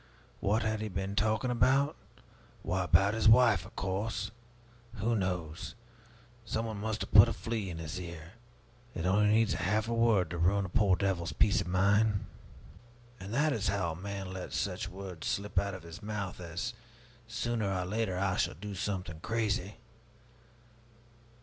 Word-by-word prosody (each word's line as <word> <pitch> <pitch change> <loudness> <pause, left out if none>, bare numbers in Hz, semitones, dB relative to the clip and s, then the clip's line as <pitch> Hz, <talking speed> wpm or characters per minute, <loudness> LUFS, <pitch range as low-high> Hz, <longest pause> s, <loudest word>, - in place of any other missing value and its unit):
What 105 +4 +1
had 110 -1 -1
he 110 - -2
been 95 +1 -3
talking 110 +4 +1
about? 135 +4 +3 0.7
Why, 95 0 0
about 95 +4 +4
his 110 0 +4
wife, 110 -6 +5
of - - -17
course. 100 +4 -2 0.6
Who 115 +2 0
knows? 90 -5 -3 0.7
Some 110 0 -2
one 110 -2 -4
must 110 +1 -3
have - - -4
put 100 -1 +9
a - - -2
flea 110 -4 -3
in 85 - -5
his 80 +3 -5
ear. 85 -2 -8 0.6
It 85 - -3
needs 105 +3 +3
only - - -3
half 105 +4 +1
a 115 - -1
word 110 -8 +3
to 85 - -4
ruin 95 +4 +3
a - - -6
poor 95 +1 +3
devil's 90 -3 -1
peace 105 - +3
of - - -5
mind. 100 +3 +2 0.9
And 95 +2 -8
that 150 +5 +2
is 110 -4 -1
how 95 -3 0
a - - -6
man 95 +1 -5
lets 95 -1 -4
such 95 -1 -2
words 95 -3 -7
slip 100 -2 0
out 100 -1 -2
of 90 - -10
his 85 +1 -10
mouth 105 -3 -4
as 90 +7 -4 0.5
'Sooner 115 -3 -1
or 90 -1 -1
later 100 -1 -1
I 95 -1 0
shall - - 0
do 100 +5 -7
something 90 -4 -3
crazy!' 105 -1 -1
100 Hz, 170 wpm, -31 LUFS, 90-110 Hz, 0.9 s, put